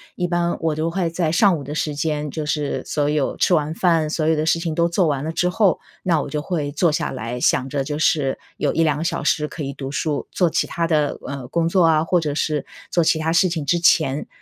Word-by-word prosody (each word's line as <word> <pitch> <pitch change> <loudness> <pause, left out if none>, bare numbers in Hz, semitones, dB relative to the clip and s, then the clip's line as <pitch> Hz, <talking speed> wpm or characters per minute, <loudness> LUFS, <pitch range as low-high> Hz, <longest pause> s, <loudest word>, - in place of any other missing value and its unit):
一 180 -1 -1
般 175 0 0
我 160 -2 0
都 160 +2 -1
会 175 -2 -1
在 165 -1 -1
上 180 0 +4
午 140 - -7
的 145 +2 -6
时 150 -1 -2
间， 150 0 -2
就 155 -2 -4
是 150 -1 -2
所 145 -1 0
有 150 -2 0
吃 180 - +2
完 155 -1 +1
饭， 165 -3 +2
所 155 0 -1
有 160 - +3
的 155 +1 -1
事 165 +1 +2
情 165 -2 -3
都 170 +1 +2
做 170 -1 +2
完 140 -1 -1
了 160 - -2
之 175 - 0
后， 185 +1 +2 0.2
那 165 -4 +2
我 - - -6
就 150 +1 -2
会 150 -4 -2
坐 165 +1 +2
下 150 - -1
来 125 -1 -5
想 130 +2 +1
着 140 -1 -2
就 150 0 -3
是 150 -3 +1 0.2
有 - - 0
1、2 160 -3 +2
个 160 - -3
小 170 -1 -2
时 150 -1 +1
可 150 0 -7
以 140 - -3
读 135 -1 -6
书， 145 +1 -2
做 175 -3 +2
其 - - 0
它 170 0 -1
的， 150 -3 +1
呃， 140 -3 -6
工 165 +4 0
作 180 -2 +3
啊， 155 -1 +4
或 175 +2 +2
者 150 -3 -2
是 150 -2 -1 0.2
做 175 - +2
其 160 - +3
它 160 +1 0
事 170 +2 +4
情 165 -4 -3
之 170 +5 +2
前 155 -4 +2
155 Hz, 275 characters per minute, -21 LUFS, 150-170 Hz, 0.2 s, 上